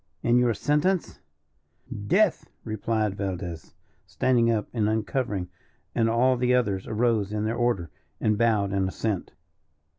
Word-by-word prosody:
"And 120 +1 +4
your 120 -2 +2
sentence?" 150 - 0 0.9
"Death!" 200 - +2
replied 110 -1 -1
Valdez, 90 -5 -5 0.3
standing 115 +8 +2
up 110 -2 0
and 110 -3 +1
uncovering, 110 -3 -1 0.5
and 115 -1 +2
all 125 +3 +3
the 125 +1 +2
others 100 -6 0
arose 110 -3 +1
in 105 0 -1
their 110 - 0
order, 120 -9 0 0.3
and 110 - +2
bowed 105 -3 +2
in 95 -1 +1
assent. 100 0 -3
110 Hz, 130 wpm, -26 LUFS, 100-120 Hz, 0.9 s, And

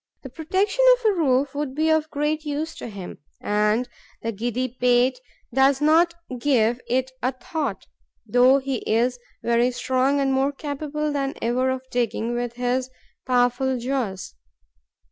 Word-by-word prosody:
The 265 - -7
protection 380 - 0
of 480 -4 +2
a - - -1
roof 275 -5 +1
would 285 -2 -3
be 315 +1 +2
of 315 0 +1
great 300 +1 -1
use 305 +2 -3
to - - -6
him; 200 -5 -8 0.2
and 210 +4 +1 0.4
the 230 - -1
giddy 240 +4 -2
pate 250 +1 +2 0.3
does 270 +1 +4
not 330 +3 +4 0.2
give 240 -3 +2
it 260 +1 0
a 255 - +1
thought, 260 - -4 0.4
though 250 +4 +5
he 270 -1 -2
is 245 +3 +1 0.2
very 235 +1 +3
strong 260 +3 +1
and 270 -1 +1
more 270 +2 +1
capable 300 +1 -3
than 275 -1 -2
ever 250 +3 +1
of 260 0 -3
digging 235 -1 -1
with 240 0 -2
his 250 +1 -1 0.4
powerful 250 +1 +2
jaws. 235 - -3
260 Hz, 150 wpm, -23 LUFS, 245-290 Hz, 0.4 s, though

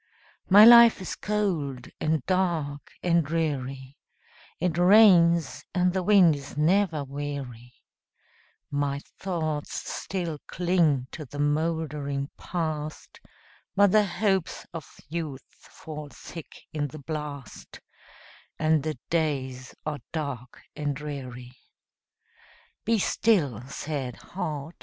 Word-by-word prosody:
My 205 +3 +10
life 235 0 +9
is 185 - -5
cold, 170 -12 -2
and 155 0 0
dark, 170 -6 -1
and 170 -1 +3
dreary; 140 -4 -3 0.6
It 180 -3 0
rains, 175 -5 +5
and 180 0 +2
the 190 - 0
wind 180 -4 +5
is 140 0 -9
never 165 -1 +2
weary; 135 -4 -6 1.0
My 140 -1 -1 0.2
thoughts 155 -5 -3
still 170 -5 -4
cling 170 -7 +2
to 160 - -7
the 145 - -10
moldering 145 -2 -1
Past, 155 -3 -4 0.6
But 200 -1 +5
the 210 0 +4
hopes 190 -1 -1
of 160 -4 -8 0.2
youth 155 -4 -5
fall 150 -2 -10
thick 165 +2 -10 0.2
in 150 -2 -1
the 145 - -10
blast, 150 -2 -7 0.8
And 155 -1 +2
the 155 0 -3
days 130 -6 -1
are 150 -1 -3
dark 140 -6 -5
and 145 -2 -2
dreary. 130 -4 -7 1.3
Be 230 +1 +3
still, 170 - +2
sad 140 -4 -4
heart! 160 -4 -5
155 Hz, 110 wpm, -27 LUFS, 140-175 Hz, 1.3 s, My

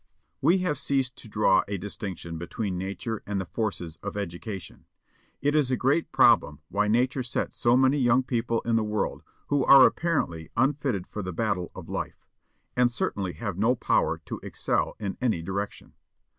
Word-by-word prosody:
We 170 +7 +5
have 150 -5 0
ceased 135 -1 0
to 110 - -10
draw 105 -2 +4
a 100 0 -2
distinction 90 -4 -6
between 95 +3 -3
Nature 100 +4 -4
and 100 -1 -1
the 95 - -3
forces 90 -5 -3
of 100 0 -6
education. 95 -1 -6 0.6
It 145 +1 +2
is 150 -4 +3
a 130 - +1
great 140 +7 +1
problem 75 0 +4
why 105 +1 +1
Nature 125 +5 +2
sets 120 -1 -3
so 120 +1 +3
many 130 +2 +4
young 125 0 +4
people 115 -2 -1
in 115 -1 +1
the 110 - +1
world 105 0 -2 0.3
who 145 -2 +2
are 135 -2 +9
apparently 105 - 0
unfitted 130 -7 +1
for 105 - -6
the 95 -2 -5
battle 95 -3 -1
of - - -9
life, - - -5 0.5
and 125 -1 +3
certainly 95 -6 -2
have 100 -5 -5
no 115 +4 +3
power - - +1
to - - -5
excel - - -1
in 100 -3 -4
any 110 -10 +1
direction. 100 +3 -5
110 Hz, 175 wpm, -27 LUFS, 95-130 Hz, 0.6 s, are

